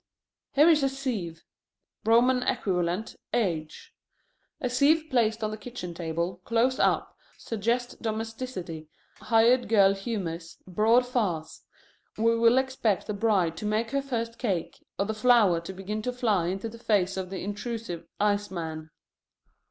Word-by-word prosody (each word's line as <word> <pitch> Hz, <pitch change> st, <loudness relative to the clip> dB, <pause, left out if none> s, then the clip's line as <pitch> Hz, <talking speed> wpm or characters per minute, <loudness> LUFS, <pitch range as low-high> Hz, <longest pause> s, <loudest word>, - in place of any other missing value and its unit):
Here 295 Hz, +3 st, +6 dB
is 315 Hz, -3 st, +5 dB
a 270 Hz, -, +2 dB
sieve: 225 Hz, -12 st, -4 dB, 0.6 s
Roman 245 Hz, +3 st, +4 dB
equivalent, 180 Hz, -2 st, -1 dB, 0.2 s
H. 165 Hz, -9 st, -2 dB, 0.7 s
A 250 Hz, -, -1 dB
sieve 290 Hz, +6 st, +3 dB
placed 225 Hz, -3 st, +1 dB
on 215 Hz, -, -1 dB
the 215 Hz, -, -5 dB
kitchen 220 Hz, -6 st, -7 dB
table, 170 Hz, +2 st, -3 dB
close 235 Hz, +3 st, +1 dB
up, -, -, +1 dB, 0.2 s
suggests 235 Hz, +3 st, -1 dB
domesticity, 220 Hz, -8 st, -5 dB, 0.3 s
hired 240 Hz, +2 st, +3 dB
girl 200 Hz, -3 st, +5 dB
humors, 185 Hz, -5 st, -5 dB
broad 220 Hz, +7 st, +3 dB
farce. 200 Hz, -11 st, -2 dB, 0.6 s
We 230 Hz, +1 st, +3 dB
will 230 Hz, +2 st, +4 dB
expect 260 Hz, -6 st, 0 dB
the 210 Hz, -, -3 dB
bride 200 Hz, -6 st, +1 dB
to 210 Hz, -, -3 dB
make 220 Hz, +2 st, 0 dB
her 275 Hz, -, +1 dB
first 230 Hz, -4 st, -4 dB
cake, 195 Hz, -9 st, -2 dB
or 200 Hz, -, +1 dB
the 220 Hz, -, -2 dB
flour 215 Hz, -7 st, +4 dB
to 170 Hz, -, -7 dB
begin 195 Hz, +3 st, -5 dB
to 250 Hz, -, -2 dB
fly 215 Hz, -8 st, +1 dB
into 195 Hz, +5 st, -3 dB
the 230 Hz, +1 st, -10 dB
face 195 Hz, -5 st, +1 dB
of 190 Hz, -1 st, -4 dB
the 190 Hz, -1 st, -5 dB
intrusive 205 Hz, -3 st, -5 dB
ice 205 Hz, 0 st, +1 dB
man. 160 Hz, -3 st, -5 dB
215 Hz, 145 wpm, -27 LUFS, 185-240 Hz, 0.7 s, Here